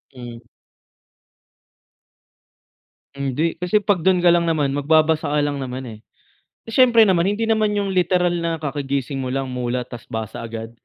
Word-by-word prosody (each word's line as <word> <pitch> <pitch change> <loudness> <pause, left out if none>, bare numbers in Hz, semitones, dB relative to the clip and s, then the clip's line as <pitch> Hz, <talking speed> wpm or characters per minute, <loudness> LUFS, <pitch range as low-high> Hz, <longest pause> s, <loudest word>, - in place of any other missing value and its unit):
Mhm. 120 -2 -9 2.8
Hindi, 140 +4 -1
kasi 180 +5 +1
‘pag 200 -5 0
do'n 185 -1 +3
ka 175 - +5
lang 170 0 +3
naman, 155 -4 +1
magbabasa 155 +2 +1
ka 150 - +2
lang 145 -1 -1
naman, 130 -1 -5
eh. 110 - -10 0.7
Siyempre 235 -1 +5
naman, 185 -4 +3
hindi 205 +3 0
naman 215 -1 +1
yung 200 -1 -1
literal 180 -1 +2
na 170 -1 -2
kakagising 140 -1 -3
mo 130 - -3
lang, 135 0 -3
mulat 125 0 -3
ta’s 120 -2 -10
basa 110 -1 -6
agad, 115 -1 -7
150 Hz, 150 wpm, -21 LUFS, 130-180 Hz, 2.8 s, ka